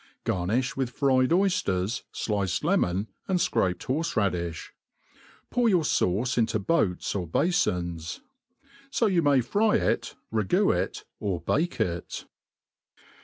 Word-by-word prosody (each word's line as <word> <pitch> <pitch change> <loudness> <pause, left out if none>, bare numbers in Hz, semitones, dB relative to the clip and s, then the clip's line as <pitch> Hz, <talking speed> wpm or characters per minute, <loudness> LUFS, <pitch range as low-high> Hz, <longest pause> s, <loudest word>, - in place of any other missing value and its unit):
Garniih 110 +9 0
with 130 -2 -1
fried 130 -1 +2
oyfters, 120 - +1
fiiced 100 -5 -1
lemon, 90 +4 +1 0.2
and 190 - +2
fcraped 90 - 0
horfe 160 +6 -1
raddiihs 90 -5 -1 0.8
|>our 245 -2 +4
your 180 -5 +3
fauce 120 0 +1
into 110 -1 +2
boats 100 - 0
or 90 -4 -3
bafons. 85 - 0 0.7
So 240 - +1
you 185 -5 +3
may 145 -4 +4
fry 210 - +2
it, - - 0 0.2
ra.. 110 -1 +1
goo 95 - +3
it, - - -2 0.2
or 95 -4 -1
bake 175 +3 0
it. 85 -1 -2
115 Hz, 125 wpm, -27 LUFS, -, 0.8 s, |>our